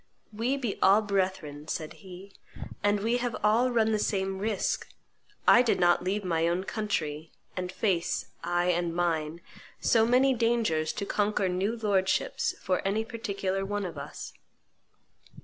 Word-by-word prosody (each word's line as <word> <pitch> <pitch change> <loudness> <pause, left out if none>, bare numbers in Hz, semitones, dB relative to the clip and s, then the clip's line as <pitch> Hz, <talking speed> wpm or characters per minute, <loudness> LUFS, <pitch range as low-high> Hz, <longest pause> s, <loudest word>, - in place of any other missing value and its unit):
"We 240 +6 0
be 240 -7 -3
all 200 +3 +5
brethren," 185 -7 -2
said 155 -1 -4
he, 190 0 -11 0.5
"and 205 0 +2
we 230 +3 +1
have 245 -1 -2
all 225 +4 +4
run 225 -2 +2
the 215 - +1
same 190 -2 -1
risk; 210 -1 -1 0.6
I 240 - +8
did 245 - +1
not 175 0 +4
leave 200 +3 -1
my 165 -2 +1
own 175 +2 0
country, 165 -8 -3 0.2
and 180 0 -3
face, 185 -4 0 0.2
I 175 +1 +1
and 170 -1 -1
mine, 165 -2 -1 0.4
so 225 -1 +3
many 260 +2 +4
dangers 230 -10 +1
to 200 - -4
conquer 205 -1 0
new 190 +6 -1
lord 200 -4 +1
ships - - 0
for 185 0 0
any 210 +3 0
particular 200 -5 -3
one 205 0 -2
of 170 -3 -6
us." 140 - -8
195 Hz, 155 wpm, -28 LUFS, 175-220 Hz, 0.6 s, I